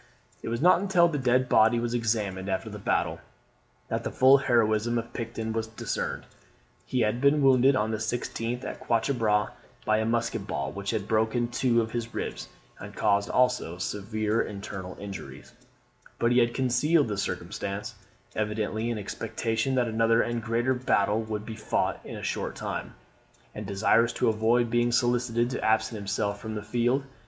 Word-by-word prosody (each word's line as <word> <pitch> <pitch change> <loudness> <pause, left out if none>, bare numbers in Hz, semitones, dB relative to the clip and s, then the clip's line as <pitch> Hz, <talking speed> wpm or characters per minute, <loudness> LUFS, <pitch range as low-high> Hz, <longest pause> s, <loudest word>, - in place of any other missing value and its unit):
It - - -5
was 115 +5 -2
not 180 0 +6
until 185 -3 +4
the 150 -4 -2
dead 130 0 +2
body 115 0 +4
was 120 0 -2
examined 105 -5 -1
after 95 - -2
the - - -7
battle, - - 0 0.7
that - - -2
the - - -2
full 135 +1 +6
heroism 120 -2 +2
of 115 +1 -5
Picton 115 -1 -4
was 110 0 -2
discerned. 110 - -4 0.6
He 125 - 0
had 110 +2 0
been 140 +1 +4
wounded 135 0 +5
on 110 -3 0
the 110 - -1
16th, 120 +2 -3
at - - -6
Quatre 115 +4 0
Bras, 105 -4 +1 0.3
by 110 0 +3
a 110 - 0
musket 115 +1 -1
ball, 70 0 -3
which 100 +4 -5
had 105 -3 -2
broken 110 +2 +1
two 120 -1 +2
of 110 - -6
his 120 -1 -4
ribs, - - -4 0.3
and - - -9
caused 100 -1 +2
also 125 -9 +1
severe 105 +4 -1
internal 95 -2 -6
injuries; 100 -1 -9 0.6
but 115 - +2
he 125 - +5
had 120 0 +2
concealed 135 +4 +2
the 105 - -2
circumstance, 100 +2 -4 0.4
evidently 110 +1 -1
in 115 - -2
expectation 115 +4 -2
that 125 -2 +2
another 115 +1 +3
and 120 0 -2
greater 120 +3 +1
battle 110 -4 +1
would 110 -1 -4
be 110 - -6
fought 110 - -1
in - - -8
a - - -8
short - - -3
time, - - -5 0.6
and 105 -2 -6
desirous 110 +4 +3
to 120 - +1
avoid 115 +2 +2
being 120 +1 +2
solicited 120 0 +1
to - - -3
absent 110 +1 +1
himself 100 0 -2
from 110 -1 -5
the 105 - -4
field. 120 +5 +1
115 Hz, 175 wpm, -27 LUFS, 105-120 Hz, 0.7 s, not